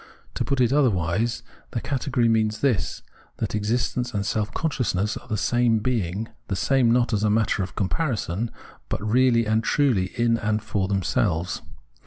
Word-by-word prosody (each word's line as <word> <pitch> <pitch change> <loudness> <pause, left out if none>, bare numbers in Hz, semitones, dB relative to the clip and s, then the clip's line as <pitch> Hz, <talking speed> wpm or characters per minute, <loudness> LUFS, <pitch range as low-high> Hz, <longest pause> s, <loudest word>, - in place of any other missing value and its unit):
To - - -1
put 140 - -1
it 125 0 +3
otherwise, 115 - +1 0.3
the 120 - 0
category 130 -2 0
means 110 -1 +1
this, 120 -11 0 0.3
that - - -3
exist 110 +3 0
ence 125 -2 -2
and 100 -1 -1
self 105 0 -1
consciousness 110 - -1
are - - -9
the 110 - -1
same 120 +1 +2
being, 110 -3 -1 0.2
the 100 - -1
same 125 +6 +2
not 120 0 +2
as 105 0 +1
a 105 - +3
matter 110 -1 +2
of 95 - -5
comparison, 110 - -1 0.4
but - - -1
really 120 0 +4
and 110 +1 +1
truly 120 -9 +2
in 115 -1 +3
and 110 -1 0
for 100 -3 -1
themselves. 90 -3 0
110 Hz, 170 wpm, -24 LUFS, 105-125 Hz, 0.4 s, really